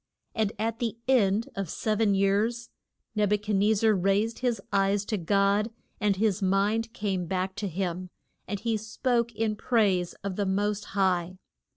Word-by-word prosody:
And 215 Hz, -2 st, 0 dB
at 225 Hz, +2 st, -2 dB
the 230 Hz, -2 st, -2 dB
end 220 Hz, -4 st, +3 dB
of 195 Hz, -, -2 dB
the -, -, -7 dB
sev 215 Hz, 0 st, -1 dB
en 205 Hz, -3 st, +3 dB
years 210 Hz, +5 st, +1 dB, 0.4 s
Neb 210 Hz, -1 st, +2 dB
u -, -, +4 dB
chad 210 Hz, 0 st, -2 dB
nez 205 Hz, +1 st, +3 dB
zar 220 Hz, -1 st, +5 dB
raised 200 Hz, +4 st, +1 dB
his 245 Hz, -4 st, 0 dB
eyes 195 Hz, +1 st, +2 dB
to 215 Hz, -, -1 dB
God, 200 Hz, +3 st, +2 dB, 0.3 s
and 205 Hz, -1 st, +2 dB
his 205 Hz, 0 st, +1 dB
mind 205 Hz, +4 st, +1 dB
came 190 Hz, -5 st, -2 dB
back 185 Hz, +1 st, -1 dB
to 205 Hz, -, -2 dB
him, 180 Hz, 0 st, -3 dB, 0.4 s
and 205 Hz, +1 st, -3 dB
he 225 Hz, +1 st, 0 dB
spoke 235 Hz, +2 st, 0 dB
in 220 Hz, -1 st, 0 dB
praise 205 Hz, -7 st, +1 dB
of 195 Hz, -2 st, -4 dB
the 205 Hz, -, 0 dB
most 205 Hz, +2 st, 0 dB
High. 185 Hz, -2 st, +1 dB
205 Hz, 180 wpm, -27 LUFS, 195-220 Hz, 0.4 s, zar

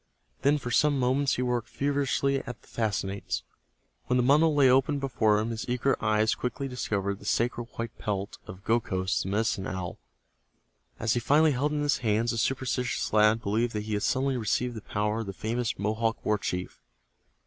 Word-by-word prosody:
Then 140 Hz, +3 st, +4 dB
for 125 Hz, -4 st, -5 dB
some 145 Hz, +3 st, +3 dB
moments 130 Hz, +2 st, +2 dB
he 125 Hz, -, -1 dB
worked 120 Hz, -1 st, -1 dB
feverishly 140 Hz, 0 st, 0 dB
at 125 Hz, -, -6 dB
the -, -, -21 dB
fastenings. 100 Hz, -, -2 dB, 0.6 s
When 125 Hz, -, +2 dB
the 125 Hz, -, +3 dB
bundle 150 Hz, +4 st, +4 dB
lay 140 Hz, -2 st, +6 dB
open 135 Hz, +3 st, +3 dB
before 115 Hz, -6 st, +2 dB
him 110 Hz, +2 st, -1 dB
his 115 Hz, +1 st, -5 dB
eager 125 Hz, +2 st, +2 dB
eyes 110 Hz, 0 st, +3 dB
quickly 135 Hz, +3 st, -3 dB
discovered 100 Hz, -6 st, -2 dB
the -, -, -13 dB
sacred 120 Hz, +2 st, 0 dB
white 115 Hz, -1 st, -4 dB
pelt 100 Hz, -1 st, -3 dB
of 95 Hz, +1 st, -10 dB
Gokhos, 100 Hz, -4 st, 0 dB
the 95 Hz, -, -4 dB
Medicine 105 Hz, -1 st, 0 dB
Owl. 90 Hz, -2 st, -5 dB, 1.0 s
As 115 Hz, -1 st, +1 dB
he 120 Hz, -, +1 dB
finally 150 Hz, +6 st, +4 dB
held 140 Hz, +3 st, 0 dB
it -, -, -2 dB
in 150 Hz, -, 0 dB
his 145 Hz, -, +1 dB
hands, 115 Hz, 0 st, +1 dB
the 115 Hz, -, -2 dB
superstitious 125 Hz, -2 st, -1 dB
lad 110 Hz, +1 st, +4 dB
believed 115 Hz, +4 st, 0 dB
that 105 Hz, -1 st, -2 dB
he 110 Hz, 0 st, -4 dB
had 105 Hz, -, 0 dB
suddenly 135 Hz, +2 st, +1 dB
received 120 Hz, +2 st, 0 dB
the 110 Hz, -, -7 dB
power 105 Hz, +2 st, -1 dB
of 115 Hz, -, -4 dB
the 95 Hz, -, -4 dB
famous 115 Hz, +4 st, -2 dB
Mohawk 110 Hz, +2 st, -1 dB
war 105 Hz, -1 st, +2 dB
chief. 90 Hz, -1 st, -4 dB
115 Hz, 190 wpm, -28 LUFS, 105-130 Hz, 1.0 s, lay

